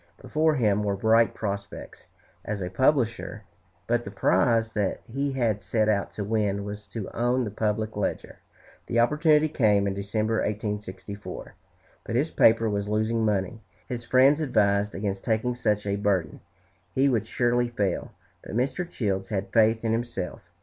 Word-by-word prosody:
Before 155 0 +1
him 105 -5 +2
were 100 -1 0
bright 110 +3 +3
prospects 100 -1 -6 0.4
as 105 -1 -3
a 90 - -4
publisher; 115 -3 +1 0.4
but 120 +2 +1
the 100 - -7
prize 110 +4 +2
that 100 -3 -1
he 135 +3 -2
had 115 -6 0
set 105 +2 0
out 100 -2 +1
to 105 - -4
win 100 -1 0
was 105 0 -7
to 105 0 -6
own 120 +2 +1
the 105 - -4
"Public 110 +1 -1
Ledger." 105 - -3 0.5
The 120 - +1
opportunity 150 +5 +4
came 105 -9 +2
in 100 - 0
December, 105 +3 -1
1864. 105 -1 -5 0.5
But 115 - -4
his 145 +6 +1
paper 115 0 +4
was 100 -1 -2
losing 110 +2 0
money. 105 +1 -1 0.3
His 120 -1 -4
friends 135 +5 +4
advised 105 -7 +1
against 100 -1 -3
taking 115 +2 0
such 105 -4 0
a 100 0 -1
burden; 95 -6 0 0.6
he 135 +1 +4
would 115 -5 +1
surely 120 0 +1
fail. 100 -6 -2 0.3
But - - -8
Mr. 135 +8 -1
Childs 95 - -2
had 95 -2 -3
faith 110 0 +3
in 110 - +1
himself. 115 -6 -3
110 Hz, 160 wpm, -26 LUFS, 100-120 Hz, 0.6 s, opportunity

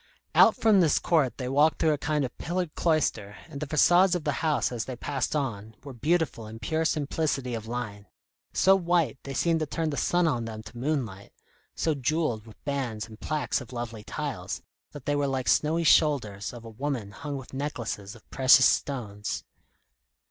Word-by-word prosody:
Out - - +7
from 215 -3 +4
this 160 -4 +3
court 155 -7 +1
they 125 - -4
walked 145 +4 +3
through 160 -2 +3
a - - -1
kind 150 -1 0
of 125 - -7
pillared 175 -1 -2
cloister, 125 - 0
and 150 -4 -8
the 150 - -3
façades 175 +5 +5
of 175 - -2
the 150 - 0
house 155 -4 +1
as 120 -2 -3
they 130 - -5
passed 135 +3 -2
on, 110 -7 -3
were 140 -2 -8
beautiful 145 -3 0
in 110 +1 -9
pure 160 +9 -1
simplicity 145 -4 -1
of 110 -1 -5
line; 110 -4 -5 0.4
so 190 +1 +5
white, 170 -8 +1
they 135 -1 -7
seemed 165 +2 +2
to 155 - -2
turn 160 +1 -2
the 140 - -4
sun 175 -1 +2
on 120 -7 0
them 110 -1 -7
to 120 - -12
moonlight; 120 -7 -3 0.4
so 160 - +1
jewelled 135 -5 -1
with 110 - -16
bands 125 -7 -2
and 110 -1 -13
plaques 150 -2 -1
of 125 -1 -11
lovely 120 -3 -5
tiles, 135 -9 -4 0.3
that 145 -3 -10
they 145 - +1
were 145 -1 +1
like 130 -2 -2
snowy 160 +3 +2
shoulders 130 -11 +3
of 120 -1 -11
a - - -7
woman 120 -3 -3
hung 145 +6 -5
with 135 -1 -10
necklaces 120 -7 -4
of 115 - -18
precious 130 0 +6
stones. 105 -7 -1
140 Hz, 190 wpm, -27 LUFS, 115-155 Hz, 0.4 s, Out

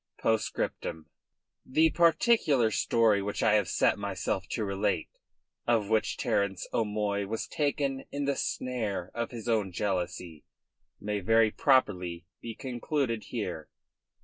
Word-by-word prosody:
POSTSCRIPTUM 95 -7 -1 0.6
The 160 +4 +3
particular 160 - +3
story 110 -1 +3
which 100 +1 -3
I 110 - +4
have 105 - +3
set - - +2
myself 95 -2 -2
to 110 - -2
relate, 100 -3 -1 0.6
of 110 -4 +2
how 110 0 +5
Sir - - -4
Terence 100 -2 0
O'Moy 105 -2 0
was 110 +2 -3
taken 140 -2 -1
in 140 0 -2
the 140 0 +1
snare 110 -11 -3
of 115 -1 -2
his 120 -2 -8
own 110 -5 +1
jealousy, 90 -4 -3 0.6
may 105 0 -2
very 115 +3 +4
properly 90 -12 +1 0.2
be 115 -1 -6
concluded 125 -2 -2
here. 90 -9 -4
110 Hz, 130 wpm, -29 LUFS, 100-125 Hz, 0.6 s, how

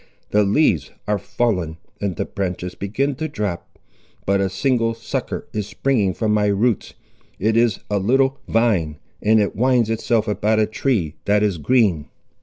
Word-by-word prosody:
The 105 - +4
leaves 100 - +2 0.2
are 105 -1 +1
fallen, 90 -8 -1 0.2
and 100 -3 -1
the - - -2
branches 90 -2 -4
begin 130 +10 -1
to 155 - -2
drop. 105 - -5 0.5
But 100 0 +2
a 95 - +1
single 115 +3 0
sucker 115 - -4
is 105 -2 -2
springing 105 -10 0
from 110 -2 0
my 105 -1 +2
roots; 105 +3 0 0.4
it 110 +3 +1
is 115 -1 +2
a 105 -1 0
little 135 +6 +2
vine, 100 -10 +1 0.2
and 110 +1 +4
it 105 - 0
winds 120 0 +2
itself 115 0 0
about 105 +1 +1
a 110 - +4
tree 105 - -1
that 105 +1 +3
is 100 -6 0
green. 95 - +2
105 Hz, 165 wpm, -21 LUFS, 95-115 Hz, 0.5 s, The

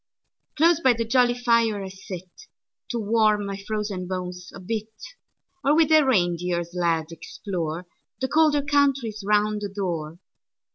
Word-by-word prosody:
Close 325 +1 +4
by 260 -2 +4
the 230 0 -2
jolly 245 +1 +3
fire 230 -4 +2
I 190 - -6
sitTo 185 -1 -9 0.7
warm 215 -2 +2
my 200 0 -4
frozen 200 -2 -4
bones 180 -1 -5
a - - -10
bit; 215 +3 -4 0.7
Or 285 +2 +4
with 320 0 +3
a 310 0 +7
reindeer 175 -7 +1
sled, 170 -2 -1
exploreThe 165 0 -5 0.5
colder 305 -2 +4
countries 275 -7 +1
round 210 +1 +1
the 205 - -3
door. 170 -5 -4
210 Hz, 135 wpm, -24 LUFS, 180-240 Hz, 0.7 s, a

